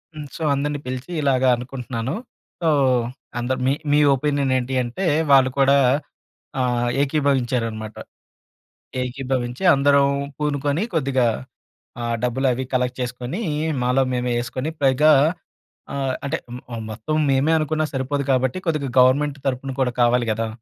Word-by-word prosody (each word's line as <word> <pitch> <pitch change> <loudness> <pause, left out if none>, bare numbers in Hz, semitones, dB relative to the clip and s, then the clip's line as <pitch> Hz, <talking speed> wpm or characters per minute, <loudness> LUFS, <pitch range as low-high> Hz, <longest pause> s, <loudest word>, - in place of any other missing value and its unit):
హ్మ్. 150 - -6
సో - - -9
అందరిని 145 +1 -1
పిలిచి 130 +6 -5
ఇలాగ 135 -2 +2
అనుకుంటున్నాను. 125 - -5 0.5
సో 165 - +2 0.7
అందరు 130 +2 -1
మీ 135 - +3 0.2
మీ 150 - +5 0.2
ఒపీనియన్ 140 -1 0
ఏంటి 130 +1 -3
అంటే 125 +11 -4 0.3
వాళ్ళు 135 -1 +6
కూడా 140 +1 +5 0.8
ఆహ్, 120 -1 +1
ఏకీభవించారనమాట. 125 -7 -1 1.1
ఏకీభవించి 125 +1 -3
అందరం 140 0 +4 0.3
పూనుకొని 150 +3 -1
కొద్దిగా 130 -5 +1 0.7
ఆ - - -2 0.2
డబ్బులు 130 +2 0
అవి 130 +2 -3
కలెక్ట్ 125 0 0
చేస్కొని 125 - -4 0.4
మాలో 125 +2 +2
మేమే 125 0 -1
ఏస్కొని 130 +5 -4
పైగా 140 +3 +5 0.8
ఆహ్, 135 -2 -1
అంటే 155 +3 -1 0.2
మ్ - - -8 0.2
మ్ 110 - -5
మొత్తం 115 +8 -3
మేమే 135 +4 +2
అనుకున్నా 155 0 0
సరిపోదు 135 +1 -1
కాబట్టి 130 +6 +1
కొద్దిగ 150 -4 0
గవర్నమెంట్ 140 +3 +3
తరపున 135 +1 -2
కూడా 125 -1 0
కావాలి 120 0 +3
గదా! 115 +1 -2
130 Hz, 130 wpm, -22 LUFS, 125-145 Hz, 1.1 s, వాళ్ళు